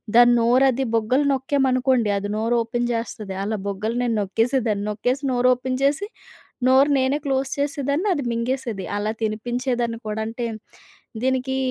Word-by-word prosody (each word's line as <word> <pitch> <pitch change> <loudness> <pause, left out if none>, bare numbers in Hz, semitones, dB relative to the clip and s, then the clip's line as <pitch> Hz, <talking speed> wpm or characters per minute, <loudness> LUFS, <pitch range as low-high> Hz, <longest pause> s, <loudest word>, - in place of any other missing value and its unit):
దాని 240 0 +7
నోరు 245 +3 +4
అది 265 +2 -1
బుగ్గలు 250 +6 +2
నొక్కామనుకోండి, 260 -3 +1
అది 200 +1 -4
నోరోపెన్ 235 +1 0
జేస్తది. 215 -4 -4
అలా 215 +1 -2
బుగ్గలు 210 +4 -2
నేను 235 -2 0
నొక్కేసే 225 +6 +1
దాన్ని. 205 -1 -1
నొక్కేసి 250 +6 -1
నోరోపెన్ 255 +1 +1
జేసి, 295 +9 +1 0.6
నోరు 265 +2 +5
నేనే 265 +2 +1
క్లోజ్ 270 -1 0
చేసేదాన్ని 285 +5 -1
అది 290 -5 -2
మింగేసేది. 235 -3 -2
అలా 210 +1 -1
తినిపించేదాన్ని 240 +2 -1
కూడా. 215 0 -3
అంటే, 235 +2 -5 0.8
దీనికి 260 0 0
245 Hz, 140 wpm, -22 LUFS, 225-265 Hz, 0.8 s, దాని